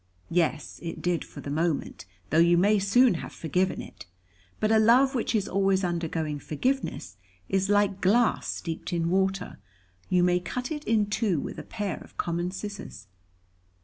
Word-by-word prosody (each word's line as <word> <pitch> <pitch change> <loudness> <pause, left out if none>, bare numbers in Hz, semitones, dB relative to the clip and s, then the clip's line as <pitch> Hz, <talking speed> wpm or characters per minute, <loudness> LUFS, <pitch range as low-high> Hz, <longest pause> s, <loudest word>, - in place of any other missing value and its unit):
"Yes, 165 -3 0
it 165 -1 -5
did 175 -2 0
for - - -11
the 140 - -6
moment, 160 -5 -1 0.3
though 160 - +4
you 170 +1 +5
may 205 +4 +4
soon 230 +5 +4
have - - -7
forgiven 180 +4 -1
it. - - -12 0.5
But 215 - +1
a 220 - +5
love 250 +5 +5
which 240 -2 -1
is 205 -2 +1
always 195 0 +1
undergoing 165 -4 -2
forgiveness, 150 - -2 0.3
is 195 0 +1
like 205 -1 +2
glass 225 +5 +3
steeped 165 +2 -4
in 170 0 0
water, 190 0 0 0.5
you 180 -1 +3
may 180 0 +3
cut 250 - -5
it 300 -1 -4
in 220 -2 +2
two 205 -5 0
with - - -6
a - - -7
pair 210 -4 -4
of - - -15
common 175 +1 -1
scissors." 200 - -7
190 Hz, 170 wpm, -27 LUFS, 170-210 Hz, 0.5 s, you